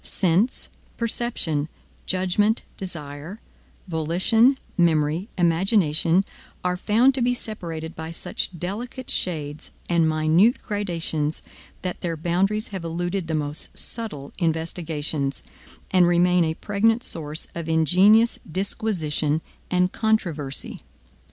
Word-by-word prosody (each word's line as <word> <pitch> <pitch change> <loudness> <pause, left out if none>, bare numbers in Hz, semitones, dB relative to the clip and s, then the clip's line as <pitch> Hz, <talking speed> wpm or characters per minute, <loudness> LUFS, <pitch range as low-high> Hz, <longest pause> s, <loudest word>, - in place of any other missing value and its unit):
Sense, 190 +7 +1 0.3
perception, 220 -10 -1 0.4
judgment, 190 +4 +1
desire, 165 +1 -6 0.5
volition, 185 - +3 0.2
memory, 165 +2 +2
imagination, 175 -1 +3 0.4
are 180 0 +1
found 225 +8 +3
to 260 - +1
be 245 +1 +2
separated 165 -9 -5
by 160 0 -6
such 170 +1 -3
delicate 235 - -4
shades 150 -4 -2 0.2
and 170 -2 +3
minute 160 +9 +4
gradations 165 -7 -1 0.4
that 180 -1 -4
their 165 -2 -2
boundaries 190 +6 0
have 190 -4 -5
eluded 175 +2 -2
the 160 - -1
most 150 0 -4
subtle 200 -12 -5
investigations, 160 -4 -1 0.5
and 180 -2 +5
remain 175 0 +4
a 160 0 -1
pregnant 225 +6 +1
source 155 -1 -4
of 165 -1 -5
ingenious 185 +9 +5
disquisition 165 -6 0 0.3
and 180 0 +2
controversy. 170 -11 -1
175 Hz, 105 wpm, -24 LUFS, 160-205 Hz, 0.5 s, and